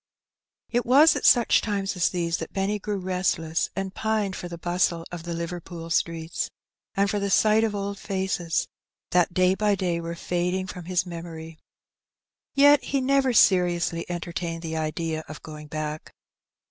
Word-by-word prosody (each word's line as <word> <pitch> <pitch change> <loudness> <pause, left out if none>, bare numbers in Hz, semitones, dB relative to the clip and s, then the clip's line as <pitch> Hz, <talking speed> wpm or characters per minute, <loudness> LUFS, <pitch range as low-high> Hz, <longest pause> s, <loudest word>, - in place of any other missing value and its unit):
It 240 0 +1
was 285 +7 +6
at - - +2
such 240 -2 +5
times 200 -2 -2
as 180 - +2
these 170 -2 -1
that - - -6
Benny 200 +1 -1
grew 205 0 -3
restless, 180 -3 -1
and 195 0 -3
pined 215 -3 -1
for 175 - -6
the 170 -1 -7
bustle 175 -1 0
of 175 -1 -7
Liverpool 170 0 -5
streets, 165 -1 -1 0.5
and 200 0 +3
for 205 +1 -1
the 200 0 -1
sight 215 +2 +4
of 215 -2 0
old 200 0 -4
faces, 190 -4 -1 0.4
that 175 -1 +2
day 185 0 +4
by 205 +1 +2
day 175 -3 -1
were 170 0 -5
fading 180 +2 -1
from 180 -2 -8
his 180 0 0
memory. 165 -2 -8 1.0
Yet 285 0 +6
he 280 - 0
never 270 0 +2
seriously 175 -5 +3
entertained 170 -1 -4
the 160 -1 -4
idea 160 0 -2
of 155 - -10
going 150 -1 -9
back. 155 0 -5
180 Hz, 160 wpm, -25 LUFS, 165-200 Hz, 1.0 s, was